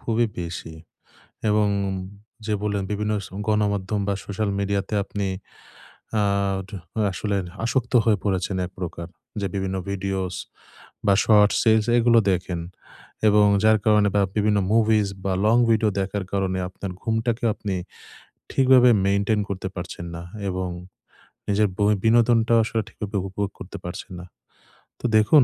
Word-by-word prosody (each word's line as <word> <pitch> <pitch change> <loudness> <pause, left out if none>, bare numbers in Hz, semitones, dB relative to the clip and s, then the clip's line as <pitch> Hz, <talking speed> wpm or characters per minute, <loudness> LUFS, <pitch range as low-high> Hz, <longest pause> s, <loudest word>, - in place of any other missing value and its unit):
খুবই 115 0 +1
বেশি 85 -2 -6 0.8
এবং 105 0 +3 0.2
উন 95 - -2 0.5
যে 110 - 0
বললেন, 100 -2 -1
বিভিন্ন 105 +1 -1 0.3
গণমাধ্যম 105 -1 0
বা, 100 - +1
সোশ্যাল 100 +1 -2
মিডিয়াতে 100 0 -1
আপনি 100 0 -3 1.0
আড 100 -1 0 0.4
আসলে 100 +2 -2 0.3
আসক্ত 120 +1 -1
হয়ে 110 -2 +3
পড়েছেন 95 -1 -1
এক - - -12
প্রকার। 85 -1 -5 0.3
যে 100 - -1
বিভিন্ন 95 -1 -2
ভিডিওস 95 -1 -2 0.7
বা, 100 - +5
শর্টস, 105 -2 +5
এলস 110 0 +3
এগুলো 115 0 +5
দেখেন 90 -1 -1 0.7
এবং 105 0 +5 0.2
যার 110 0 +5
কারণে 105 -1 +4
বা 100 - +4
বিভিন্ন 105 0 +2
মুভিস 110 -2 +3 0.2
বা, 95 - 0
লং 110 +2 +4
ভিডিও 110 -1 +3
দেখার 95 0 -2
কারণে 95 -1 0
আপনার 95 +1 -7
ঘুমটাকে 115 +1 -1
আপনি 100 -2 -4 0.8
ঠিকভাবে 130 -2 +6 0.2
মেইনটেইন 100 +2 +2
করতে 95 -1 -3
পারছেন 90 -1 -6
না 85 - -6 0.3
এবং 95 0 -2 0.8
নিজের 105 0 +3
বই 105 0 +3
বিনোদনটা 115 0 +4
আসলে 110 0 -1
ঠিকভাবে 105 -2 -5
উপভোগ 100 +1 -2
করতে 100 +2 -8
পারছেন 90 +1 -7
না। 90 - -9 0.7
তো - - -8
দেখুন, 115 +6 +6
100 Hz, 135 wpm, -24 LUFS, 95-110 Hz, 1.0 s, ঠিকভাবে